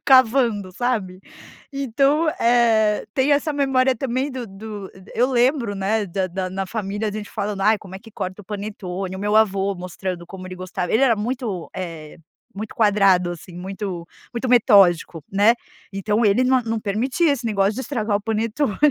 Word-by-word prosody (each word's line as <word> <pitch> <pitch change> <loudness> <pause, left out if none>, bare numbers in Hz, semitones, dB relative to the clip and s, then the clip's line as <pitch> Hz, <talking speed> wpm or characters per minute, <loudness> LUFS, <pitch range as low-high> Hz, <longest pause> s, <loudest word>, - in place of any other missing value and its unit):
cavando, 235 -7 +4
sabe. 200 -5 -2 0.5
Então 275 +4 +1
eh 225 -3 +3
tem 270 +2 +3
essa 295 +2 +1
memória 265 -2 +2
também 260 +3 -1
do 255 -3 -5
do 205 0 -8 0.2
eu 250 +3 +2
lembro, 245 -3 +2
né 200 +2 0
da 185 +1 -1
da 185 +1 -4
na 190 +1 -3
família 205 0 -3
a - - -4
gente 210 -1 -6
falando: 205 -1 -3
"Ai, 215 +1 +4
como 190 -2 -12
é - - -6
que 225 +2 -15
corta 190 0 -5
o - - -22
panetone?" 195 -2 -5
E - - -5
o - - -7
meu 210 +1 +1
avô 200 -2 +2
mostrando 180 -1 -5
como 185 -1 -9
ele 185 - -7
gostava 180 -1 -4
ele 225 - +3
era 240 -4 +5
muito, 220 -5 -3
eh, 165 -4 -6 0.4
muito 215 +2 -6
quadrado 195 -5 +3
assim, 175 +1 -11
muito 190 -2 -5 0.3
muito 240 +2 -3
metódico, 195 - +4
né. 205 +4 +4 0.4
Então 210 +3 0
ele 210 +5 +4
não 260 0 +4
não 225 -1 -2
permitia 255 - +1
esse 250 -4 -3
negócio 200 -1 +1
de 260 - -4
estragar 220 -7 -1
o 205 - -4
panetone. 225 +2 -1
210 Hz, 180 wpm, -22 LUFS, 190-240 Hz, 0.5 s, era